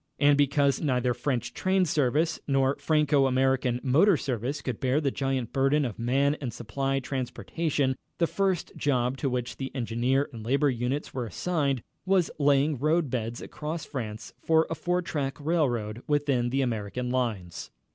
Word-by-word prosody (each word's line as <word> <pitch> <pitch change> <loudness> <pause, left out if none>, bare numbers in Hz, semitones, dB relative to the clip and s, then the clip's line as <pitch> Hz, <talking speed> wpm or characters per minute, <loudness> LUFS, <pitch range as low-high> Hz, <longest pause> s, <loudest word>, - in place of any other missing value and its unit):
And 145 0 +5
because 140 -1 +2
neither 125 -4 +1
French 125 0 -2
train 185 0 +2
service 150 +2 +1
nor 135 -1 +2
Franco 150 -3 +3
American 130 -1 +1
motor 160 +8 +4
service 130 +2 -3
could 125 -4 -3
bear 130 +2 +2
the 140 -3 0
giant 135 -4 -2
burden 135 +2 +2
of 120 -3 -5
man 140 +5 +2
and 125 -4 -3
supply 135 +4 -2
transportation, 135 +2 -2 0.2
the 170 - +3
first 190 0 -1
job 125 -3 +1
to 135 - -1
which 125 -1 -3
the 135 -1 -4
engineer 125 +3 0
and 115 -2 -8
labor 140 +4 +2
units 125 +4 -2
were 125 -3 -3
assigned 140 -3 -1 0.2
was 185 -2 +2
laying 145 0 +3
road 155 0 +1
beds 115 -1 -3
across 155 +2 -5
France 110 -5 -6
for 160 0 +4
a - - +2
four 175 +3 -1
track 140 -5 -3
railroad 125 -9 0
within 140 -5 +1
the 135 +2 +1
American 120 0 -2
lines. 110 -9 -2
135 Hz, 160 wpm, -27 LUFS, 125-150 Hz, 0.2 s, And